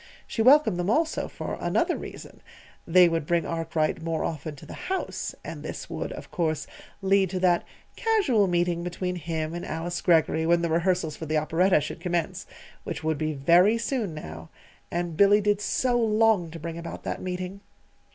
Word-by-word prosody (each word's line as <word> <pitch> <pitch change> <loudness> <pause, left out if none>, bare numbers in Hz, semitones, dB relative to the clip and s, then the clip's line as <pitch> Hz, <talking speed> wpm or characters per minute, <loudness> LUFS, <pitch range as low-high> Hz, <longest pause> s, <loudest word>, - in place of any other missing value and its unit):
She 225 - -2
welcomed 255 -5 +6
them, 175 +2 -1
also, 315 +7 +1
for - - -6
another - - +1
reason: - - -9 0.5
they 180 +1 +7
would 165 -3 -1
bring 170 -1 +1
Arkwright 165 0 -1
more 165 -1 -2
often 155 -1 -4
to 135 - -13
the - - -9
house, 380 0 -4
and - - -6
this - - -7
would, - - -4
of - - -10
course, 155 -4 -1 0.4
lead 195 -1 +3
to 185 0 -3
that 175 -2 +3 0.3
"casual 345 - +2
meeting" 175 -1 0
between 180 +1 -3
him 160 -1 -3
and 175 - -5
Alice 170 +2 -4
Greggory 160 -1 +3
when 170 0 +3
the 170 - 0
rehearsals 170 -2 +1
for 160 - -7
the 155 +1 +1
operetta 165 +4 +3
should 150 - -6
commence 175 -3 -2 0.4
which - - -5
would 160 -2 0
be 155 0 -1
very 175 +10 +4
soon 230 - -2
now. 80 - -8 0.4
And 175 -1 -2
Billy 200 +3 +6
did 205 0 +1
so 245 +3 +1
long 220 -5 +3
to 165 - -8
bring 165 +1 -5
about 170 - -7
that - - -4
meeting! 185 +1 -5
175 Hz, 180 wpm, -26 LUFS, 160-195 Hz, 0.5 s, they